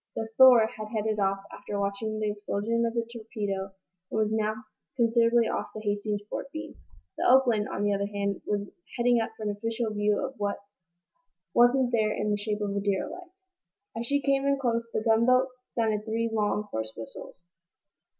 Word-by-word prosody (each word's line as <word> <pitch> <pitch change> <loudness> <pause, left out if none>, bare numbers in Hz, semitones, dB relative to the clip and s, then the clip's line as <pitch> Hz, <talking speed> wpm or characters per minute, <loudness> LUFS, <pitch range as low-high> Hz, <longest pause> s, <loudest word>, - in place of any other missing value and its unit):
The 225 0 -3
"Thor" 250 -3 +8
had 215 -1 -7
headed 215 -1 -1
off, 195 0 0
after 205 - -5
watching 200 +2 -2
the 215 -1 0
explosion 210 +3 -1
of 230 - -4
the 230 -1 0
torpedo, 205 -4 -4 0.4
and - - -3
was 215 0 +1
now 220 0 -1 0.3
considerably 235 0 +4
off - - -2
the 215 - -5
"Hastings's" 205 0 -2
port 275 - -5
beam. 315 - -6 0.5
The - - +3
"Oakland," 245 -5 +4
on 205 - -3
the 205 0 +2
other 200 0 -1
hand, 200 -1 -2
was 205 -1 -1 0.3
heading 240 0 +4
up 225 - -2
for - - -7
an 210 - 0
official 225 +2 -2
view 210 0 +1
of 265 - -6
what 205 -1 -1 1.0
wasn't 245 +1 +4
there 215 -3 +2
in 210 - -1
the 205 - +1
shape 210 0 -3
of 200 -1 -2
a - - +1
derelict. 205 - -2 0.7
As 230 +1 -3
she 285 +2 +2
came 275 0 +2
in 280 0 +3
close 235 -3 -1
the - - -1
gunboat 250 +3 +4 0.2
sounded 220 -3 0
three 225 +1 -1
long, 210 -1 0
hoarse 110 0 -3
whistles. 115 +9 -10
215 Hz, 185 wpm, -28 LUFS, 205-235 Hz, 1.0 s, Thor